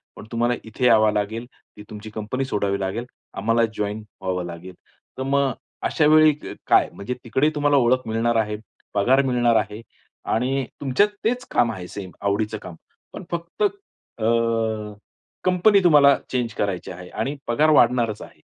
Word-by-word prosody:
पण - - -10
तुम्हाला 120 +1 +1
इथे 115 +3 -3
यावा 110 -3 +5
लागेल. 105 +3 -2 0.3
ती 105 - -10
तुमची 105 0 -8
कंपनी 110 +5 -3
सोडावी 100 -5 -1
लागेल. 100 +5 -3 0.3
आम्हाला 115 +1 +2
जॉइन 105 +1 -3 0.2
व्हावं 90 -1 -2
लागेल." 85 +2 -8 0.4
तर 130 - -2
मग 140 0 +1 0.4
अशा 155 - +1
वेळी 155 0 +7
क 150 - -9
काय? - - +4
म्हणजे 100 +5 -5
तिकडे 130 +6 +2
तुम्हाला 145 -1 +3
ओळख 130 -1 +2
मिळणार 115 +1 0
आहे, 105 -1 0 0.4
पगार 125 +7 +4
मिळणार 120 -2 +2
आहे 105 0 -1 0.5
आणि 130 +4 0 0.2
तुमच्यात 140 +9 +3 0.2
तेच 245 +3 0
काम 120 - +3
आहे 90 -5 -7
सेम 95 -1 -8
आवडीचं 105 +2 -1
काम, 85 - -9 0.4
पण - - -7
फक्त 170 - -3
अ, 395 - -4 1.2
कंपनी 185 +3 +4
तुम्हाला 145 -5 +6
चेंज 120 -3 -1
करायची 100 -4 -2
आहे 90 0 -10
आणि 135 +7 -3
पगार 150 +7 +3
वाढणारच 120 -6 +3
आहे. - - -13
115 Hz, 160 wpm, -23 LUFS, 105-135 Hz, 1.2 s, वेळी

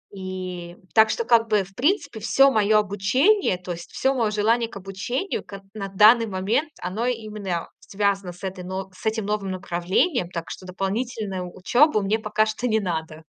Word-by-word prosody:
И 185 -2 -6 0.2
так 220 -1 +6
что, 465 - -1
как 230 - +4
бы, 210 -2 +3
в 195 +1 -16
принципе, 290 - 0
всё 270 +5 +5
моё 215 -2 +3
обучение, 210 - +2
то 180 0 -7
есть 170 -1 -7
всё 265 +1 +1
моё 230 -5 0
желание 225 +2 +1
к - - -9
обучению 200 - -3
к 200 -1 -10
на 205 -2 -5
данный 215 +4 +6
момент, 210 +10 0
оно 190 +7 -2
именно, 215 -7 -3
а, - - -23
связано 200 -2 -1
с 180 - -17
этой 190 -1 -5
нов 190 +1 -5
с - - -14
этим 220 -1 0
новым 205 -2 -2
направлением. 185 - 0
Так 170 -2 -6
что 185 - -8
дополнительную 195 0 -3
учёбу 240 - +3
мне 200 +2 +1
пока 215 0 +1
что 220 +3 -3
не 220 -2 +2
надо. 160 -4 -4
205 Hz, 185 wpm, -24 LUFS, 185-225 Hz, 0.2 s, так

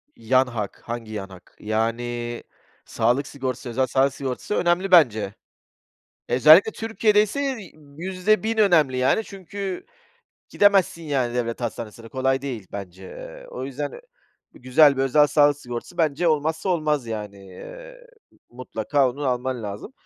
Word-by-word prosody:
Yan 130 +3 +2
hak, 110 -5 -5
hangi 115 -2 -6
yan 100 -2 -5
hak 95 -1 -16
yani 120 +2 -2 0.4
sağlık 125 +5 0
sigortası, 130 -2 -5
özel 130 +2 0
sağlık 135 +2 +2
sigortası 135 +8 -4
önemli 175 +2 +1
bence. 110 - +4 1.0
Özellikle 155 - +7
Türkiye'de 220 -2 +2
ise 270 +4 -2 0.4
%1.000 195 +5 0
önemli 165 -11 +4
yani 130 +12 +2
çünkü 195 -1 -6 0.6
gidemezsin 195 -4 +3
yani 130 -6 -1
devlet 115 -1 -2
hastanesine, 115 -1 -6
kolay 130 +2 0
değil 120 -8 -5
bence, 95 -2 -8
eee, - - -10
o 130 - -6
yüzden 140 +2 -5
ö - - -10 0.5
güzel 140 +3 +4
bir 135 - +1
özel 145 +3 +4
sağlık 145 -1 +4
sigortası 125 +7 -8
bence 160 +2 +1
olmazsa 160 +3 0
olmaz 150 -7 0
yani, 105 -3 -7
eee, - - -12 0.4
mutlaka 130 +2 -1
onu 140 +3 -5
alman 125 -1 -2
lazım. 100 - -7
135 Hz, 135 wpm, -23 LUFS, 120-170 Hz, 1.0 s, Özellikle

